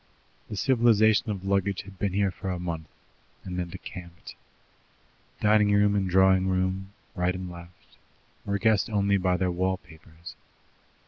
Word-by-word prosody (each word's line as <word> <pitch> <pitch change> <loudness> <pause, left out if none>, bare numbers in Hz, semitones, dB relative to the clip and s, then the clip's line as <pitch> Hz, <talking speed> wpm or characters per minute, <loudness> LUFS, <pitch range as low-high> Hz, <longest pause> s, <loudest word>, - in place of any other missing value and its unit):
The 105 - -5
civilization 110 -4 +3
of 95 -2 -4
luggage 100 0 0
had 95 -1 -14
been 100 -2 -1
here 100 -1 +1
for 95 - -6
a 90 - -2
month, 85 -3 -5 0.6
and 90 -1 -5
then 90 - -2
decamped. 90 -1 -10 1.1
Dining 105 -1 +4
room 100 0 +4
and 100 -2 0
drawing 95 0 +4
room 95 +1 -1 0.2
right 90 -2 0
and 90 -1 -6
left 85 0 -14 0.5
were 100 0 -1
guessed 110 +1 +2
only 100 -2 +2
by 90 -1 +1
their 90 0 0
wall 95 +2 0
papers. 80 -1 -14
95 Hz, 150 wpm, -27 LUFS, 90-100 Hz, 1.1 s, Dining